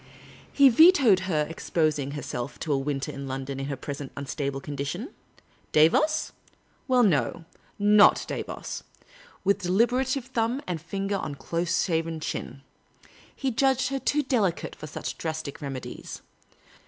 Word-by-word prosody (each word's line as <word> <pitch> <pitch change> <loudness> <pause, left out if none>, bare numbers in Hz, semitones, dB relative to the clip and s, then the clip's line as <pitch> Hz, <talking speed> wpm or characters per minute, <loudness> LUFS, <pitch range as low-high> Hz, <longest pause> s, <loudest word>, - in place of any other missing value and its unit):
He 280 -1 +6
vetoed 245 - +6
her 155 -3 +1
exposing 155 -4 -1
herself 130 -3 -5
to 150 - 0
a - - +2
winter 135 0 -2
in 140 0 -7
London 135 +1 -4
in 135 - -3
her 140 - -2
present 140 +1 -6
unstable 140 0 -3
condition. 145 - -5 0.6
Davos? 260 - +3 0.6
Well, 255 -2 +4
no. 170 -3 +1 0.3
Not 205 0 +6
Davos; - - -5 0.6
with 200 +1 +2
deliberative 245 +8 +1
thumb 245 0 -1
and 175 -4 -3
finger 195 +3 -2
on 145 -6 -4
close 170 +4 -1
shaven 165 -2 -1
chin. 135 -2 -5 0.7
He 270 -1 -1
judged 265 +1 +2
her 270 0 -2
too 295 +2 +1
delicate 220 - 0
for 155 - -9
such 150 - -6
drastic 155 -3 -4
remedies. 135 -3 -7
170 Hz, 135 wpm, -26 LUFS, 145-240 Hz, 0.7 s, He